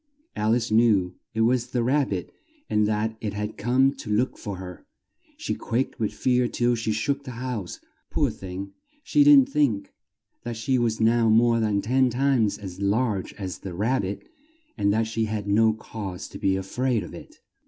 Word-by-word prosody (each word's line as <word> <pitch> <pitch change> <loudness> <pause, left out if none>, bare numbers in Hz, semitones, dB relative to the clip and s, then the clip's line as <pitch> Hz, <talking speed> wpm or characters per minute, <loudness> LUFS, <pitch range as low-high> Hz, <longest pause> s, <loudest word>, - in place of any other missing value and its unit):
Al 110 +2 +2
ice 120 -2 -2
knew 110 -5 +3 0.2
it 110 - +1
was 120 +1 +2
the 125 -1 -1
Rab 135 +3 +2
bit 95 -3 -4 0.3
and 105 0 +2
that 110 +1 -1
it 105 -2 -3
had 105 +1 -4
come 130 +4 +2
to 115 - -8
look 110 +5 +1
for 100 -3 -6
her. 90 -1 -9 0.5
She - - -3
quaked 120 +3 -2
with 110 -2 0
fear 125 -1 +1
till 120 0 +1
she 115 -1 -1
shook 140 +6 -1
the 135 - -8
house. 120 -7 -4 0.3
Poor - - +1
thing! 95 +1 -7 0.3
She 295 -1 +4
didn't 285 -2 +7
think 115 - 0 0.5
that 120 -1 -5
she 130 +3 +1
was 115 -2 0
now 115 0 +3
more 115 +1 +4
than 105 -3 0
ten 130 +3 +3
times 125 -4 +1
as 95 -2 -8
large 100 -1 0
as 95 -3 -6
the 95 -3 -7
Rab 115 +8 +1
bit, 100 +1 -5 0.5
and 100 - +1
that 110 +2 +1
she 110 0 -1
had 105 -2 -4
no 110 +2 +4
cause 105 -4 -7
to - - -9
be 95 -1 +1
a 95 - -2
fraid 120 +2 -1
of - - -10
it. - - -11
110 Hz, 195 wpm, -25 LUFS, 100-125 Hz, 0.5 s, didn't